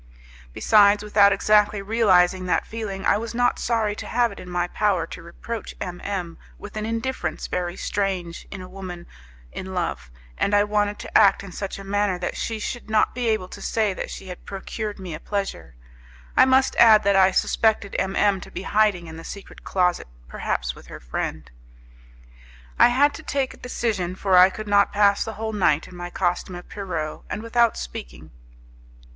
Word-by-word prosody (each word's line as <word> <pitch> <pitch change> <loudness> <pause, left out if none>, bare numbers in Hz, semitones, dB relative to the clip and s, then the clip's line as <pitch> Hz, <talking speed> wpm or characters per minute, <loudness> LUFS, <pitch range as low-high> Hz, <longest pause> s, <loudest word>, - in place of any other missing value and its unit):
Besides, 205 - +4
without 205 -1 +5
exactly 210 +1 +3
realizing 190 -4 +3
that - - +1
feeling, 215 -4 -5
I - - +4
was 230 +1 -6
not 245 0 +2
sorry 220 -3 0
to - - -6
have 240 -1 +1
it 200 - -10
in 180 - -10
my 175 0 -1
power 190 -3 0
to - - -9
reproach 205 +6 -7
M 175 -1 -6
M 180 -4 -4 0.2
with 205 - -10
an 215 0 -3
indifference 230 -7 -3
very 175 0 -3
strange 185 -4 -3
in 190 - -7
a - - -9
woman 185 -2 -8 0.5
in 190 0 -7
love, 65 - -3 0.3
and 205 - +2
I 205 - +5
wanted 210 0 0
to - - -10
act 200 -2 +5
in 195 - -9
such 195 +2 -5
a 195 - -9
manner 200 -1 0
that 175 0 -4
she 225 - -3
should 220 +1 -5
not 215 -1 +2
be 245 -1 -2
able 215 -4 0
to - - -10
say 215 -3 0
that - - -5
she 190 - -8
had 180 - -9
procured 205 +2 -5
me 185 -4 -7
a 155 - -6
pleasure. 195 - -4 0.6
I - - +7
must 265 0 +3
add 220 -2 +7
that 200 0 +3
I 190 -1 +6
suspected 210 +1 +1
M 190 +1 -1
M 200 -2 +2
to - - -10
be - - -6
hiding 205 -5 +2
in 160 0 -9
the 165 - -9
secret 200 +3 -10
closet, 180 - 0 0.2
perhaps - - -2
with - - -15
her - - -9
friend. - - -5 1.3
I - - +8
had 275 +4 +3
to - - -8
take 275 -4 -2
a - - -15
decision, 210 -8 -2
for 190 -1 +1
I 180 +1 +8
could 215 +2 -8
not 205 0 +4
pass 205 -1 +3
the 225 - -6
whole 220 +1 -4
night 170 -7 +2
in 180 - -13
my 175 0 -6
costume 180 +1 -1
of 175 - -9
Pierrot, 170 -6 -4
and 215 - -4
without 235 0 +2
speaking. - - -8
200 Hz, 195 wpm, -23 LUFS, 180-215 Hz, 1.3 s, I